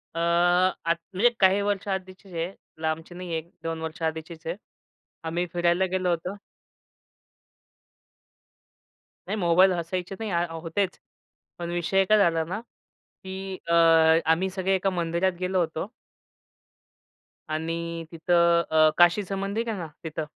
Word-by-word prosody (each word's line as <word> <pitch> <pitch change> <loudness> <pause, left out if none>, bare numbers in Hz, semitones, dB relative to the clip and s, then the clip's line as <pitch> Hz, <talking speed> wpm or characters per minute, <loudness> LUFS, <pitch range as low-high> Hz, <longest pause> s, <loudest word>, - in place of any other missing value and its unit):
अ, - - -2
आत 175 0 +2 0.2
म्हणजे 220 +6 +4
काही 190 +1 +5
वर्ष 200 -1 -1
आधीचीच 190 0 -6
आहे 170 +2 -2 0.3
लांबची 160 +2 -3
नाही 180 0 -7
आहे, 165 - -1
एक 160 +2 -7
2 165 0 -3
वर्ष 160 +2 -6
आधीचीच 160 +1 -4
आहे 170 - -2 0.7
आम्ही 175 +2 -1
फिरायला 175 +1 +2
गेलो 185 -1 +1
होतो. 180 +4 -2 2.9
नाही - - -1
मोबाईल 180 +1 +5
असायचे 180 +2 -3
नाही, 220 - -3
अ, 170 0 +1 0.2
होतेच 180 +3 -2 0.6
पण 170 0 -4
विषय 175 +3 +2
काय 215 +2 +5
झाला 170 -5 +3
ना, 180 +6 -4 0.7
की 190 0 -5
अ, 170 - +3 0.6
आम्ही 180 +4 +3
सगळे 190 0 0
एका 190 +1 +1
मंदिरात 175 +1 0
गेलो 185 0 0
होतो. 160 +1 -2 1.6
आणि 165 +1 -3
तिथं 170 0 +3
अ, 155 0 +6
काशीच 175 +3 +4
मंदिर 200 +4 -2
आहे 215 - -2
ना 170 - -5 0.2
तिथं, 160 -1 -4
175 Hz, 135 wpm, -26 LUFS, 165-190 Hz, 2.9 s, अ